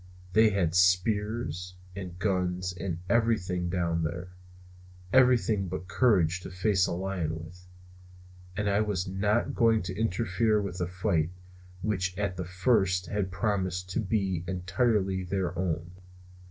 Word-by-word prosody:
They 110 0 +6
had 95 -5 0
spears 90 0 +1 0.2
and 90 -3 -7
guns 90 -2 -1
and 90 -2 -4
everything 95 -5 +1
down 85 -2 0
there, 85 +3 -3 0.8
everything 115 -6 +4
but 90 0 -5
courage 90 -3 +3
to - - -7
face 95 0 +2
a - - -3
lion 85 -3 -2
with; 90 +2 -15 0.9
and 105 - 0
I 100 +1 +3
was 100 -4 -1
not 105 +4 0
going 115 -3 +3
to 90 +1 -5
interfere 110 +1 +1
with 100 -3 -4
a 90 - 0
fight 85 -3 0 0.5
which 95 -3 -1
at 100 -2 -1
the 90 -1 -4
first 90 0 +2
had 100 -2 -1
promised 90 -1 -1
to - - -1
be 95 -5 0
entirely 95 +1 0
their 90 -1 -2
own. 85 -1 -2
95 Hz, 140 wpm, -29 LUFS, 90-105 Hz, 0.9 s, They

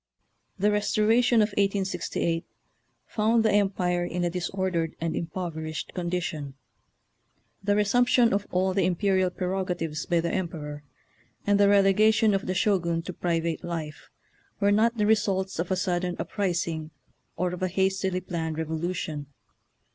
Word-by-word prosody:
The 205 +2 +2
Restoration 220 +3 +3
of 210 - 0
1868 190 -4 -1 0.6
found 225 +1 +1
the 220 - +4
em 200 -1 +3
pire 180 -2 -1
in 175 0 -2
a 175 - 0
disordered 180 -2 -2
and 165 -1 -2
impoverished 160 -2 -4
condition. 170 -6 -3 1.1
The 205 +1 +2
resumption 235 +3 +3
of 205 0 -1
all 185 +1 +1
the 195 0 +2
imperial 185 0 +2
prei*ogatives 180 -4 -3
by 170 -1 +3
the 170 +1 -1
Emperor, 150 -5 -4 0.6
and 205 0 +3
the 200 0 +5
relegation 210 +2 +4
of 195 - -1
the 185 - -1
Shogun 175 -5 +1
to 180 - -6
pri 170 -1 0
vate 165 0 -3
life, 165 -3 -6 0.5
were 200 -1 +3
not 230 +3 +3
the 210 - +2
results 195 -4 +1
of 170 - -1
a 190 - +2
sudden 180 -1 -1
uprising 170 -6 -2 0.5
or 180 +1 -1
of 180 - -6
a 185 - +1
hastily 190 0 0
planned 165 -3 -3
revolu 160 +3 -2
tion. 150 -4 -4
185 Hz, 145 wpm, -27 LUFS, 170-205 Hz, 1.1 s, the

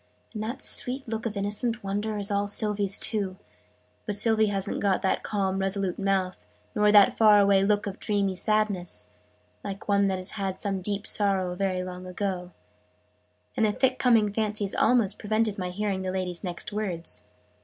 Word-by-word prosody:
"And 215 - -5
that 235 +5 -4
sweet 260 +2 -2
look 225 +1 -3
of 210 -2 -5
innocent 210 +4 -2
wonder 205 +2 -2
is 205 0 -3
all 200 0 0
Sylvie's 205 -1 +2
too. 195 -4 0 0.7
But 210 - +3
Sylvie 220 0 +3
hasn't 195 -2 -2
got 195 -2 +1
that 190 - +1
calm 195 -2 -1
resolute 195 -1 0
mouth 190 - -1 0.3
nor 210 0 +3
that 205 -1 +6
far 215 -2 +6
away 200 -1 +4
look 205 +1 +1
of 200 0 -6
dreamy 200 -3 0
sadness, 205 -2 -1 0.5
like 200 0 -7
one 200 -1 +3
that 190 -1 0
has 185 +1 -4
had 195 -2 -4
some 195 -2 -2
deep 205 +2 -1
sorrow, 195 -4 +1
very 185 -1 -1
long 180 0 -8
ago 185 -1 -3 0.5
" - - -41
And 225 - +1
the - - +1
thick 260 +3 0
coming 225 -5 +3
fancies 210 -2 0
almost 225 -4 +2
prevented 215 -1 0
my 180 -1 -3
hearing 195 0 -2
the 185 - -3
lady's 185 -1 -3
next 180 +2 -5
words. 180 - -3
200 Hz, 175 wpm, -26 LUFS, 190-215 Hz, 0.7 s, that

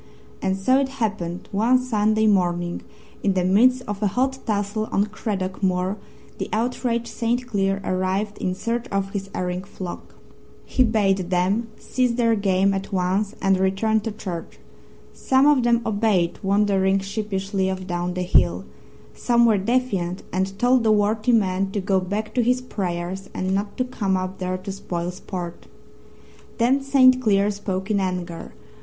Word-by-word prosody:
And 190 0 0
so 255 +8 +3
it 275 -1 0
happened 205 -7 -3
one 225 +6 +3
Sunday 220 -3 +1
morning, 175 -4 +1 0.4
in 195 -2 +1
the 185 - +2
midst 250 +7 +4
of 205 0 -4
a 210 - +3
hot 265 +6 0
tussle 210 0 -1
on 200 - +2
Craddock 205 -3 -4
Moor, 185 0 +1 0.4
the - - -3
outraged 235 +1 -1
St. 240 +2 -1
Cleer 195 -4 0
arrived 190 +3 -1
in 185 0 -1
search 230 +4 -2
of 195 0 -2
his 195 -1 -4
erring 180 0 -2
flock. 185 -2 -8 0.5
He 260 - +2
bade 195 -5 +1
them 190 +6 +1
cease 250 -2 0
their 230 -1 +2
game 195 -2 +2
at 195 +1 -4
once 195 +3 0
and 195 -1 +3
return 195 +4 +2
to 220 +1 -4
church. 185 -6 -7 0.6
Some 265 +1 +2
of 295 -3 +5
them 235 -1 +3
obeyed, 205 -5 +1
wandering 195 -1 +2
sheepishly 195 -1 -2
off 190 0 -4
down 175 -1 -2
the 180 - -1
hill; 90 - +2 0.5
some 235 -1 +3
were 215 -3 +4
defiant 195 -5 -1
and 190 +1 -1
told 245 +1 +3
the 220 - +4
worthy 215 +2 +2
man 195 -4 +2
to 205 - 0
go 190 0 +1
back 205 +4 -3
to 250 - +2
his 250 +2 +2
prayers 190 -5 -4
and 185 +1 -1
not 200 +1 -2
to 255 - 0
come 200 -7 -1
up 185 +1 -4
there 185 0 -2
to 190 +2 -6
spoil 175 -3 -4
sport. 180 -2 -7 0.9
Then 250 +4 +3
St. 260 -2 +5
Cleer 205 -3 +3
spoke 195 0 -3
in 205 - +2
anger. 180 -3 -4
200 Hz, 165 wpm, -23 LUFS, 185-225 Hz, 0.9 s, of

